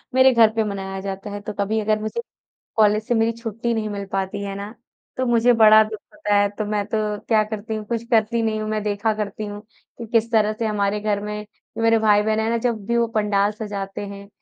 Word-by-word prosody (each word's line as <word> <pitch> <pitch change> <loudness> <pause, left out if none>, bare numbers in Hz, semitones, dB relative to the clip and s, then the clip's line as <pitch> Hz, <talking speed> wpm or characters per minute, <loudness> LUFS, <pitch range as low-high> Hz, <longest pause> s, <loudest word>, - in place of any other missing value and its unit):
मेरे 260 0 +7
घर 230 -2 +6
पे 225 0 +1
मनाया 195 -2 -4
जाता 195 +1 -5
है 205 0 -6
तो 210 +1 -6
कभी 205 +2 -1
अगर 215 0 +1
मुझे, 215 - -3 0.6
कॉलेज 215 -1 +4
से 240 - +1
मेरी 225 0 +2
छुट्टी 230 +1 -3
नहीं 220 -1 -2
मिल 200 -1 -4
पाती 195 +1 -2
है 200 -1 -4
ना, 200 +2 -7 0.4
तो 255 - -1
मुझे 240 0 +4
बड़ा 220 -2 +7
दुःख 215 0 -6 0.2
होता 210 0 -1
है। 205 0 +4
तो 215 - 0
मैं 210 -1 -1
तो 220 - -2 0.3
क्या 220 -2 +4
करती 215 0 -5
हूँ, 215 -1 -4
कुछ 230 0 -2
करती 230 0 +2
नहीं 220 -1 0
हूँ 215 - -3
मैं 215 -1 -1
देखा 210 +1 0
करती 210 0 -4
हूँ, 205 0 -7 0.4
कि 235 - -6
किस 230 0 +2
तरह 215 -1 +3
से 230 - 0
हमारे 210 -1 0
घर 205 -1 0
में, 210 0 -5 0.3
मेरे 225 0 +4
भाई-बहन 215 0 +3
है 220 - 0
ना 235 - +1
जब 230 -3 -2
भी 235 +1 +1
वो 235 0 +3
पंडाल 205 -1 +2
सजाते 205 -2 -5
हैं। 200 0 -9
215 Hz, 235 wpm, -22 LUFS, 205-225 Hz, 0.6 s, मेरे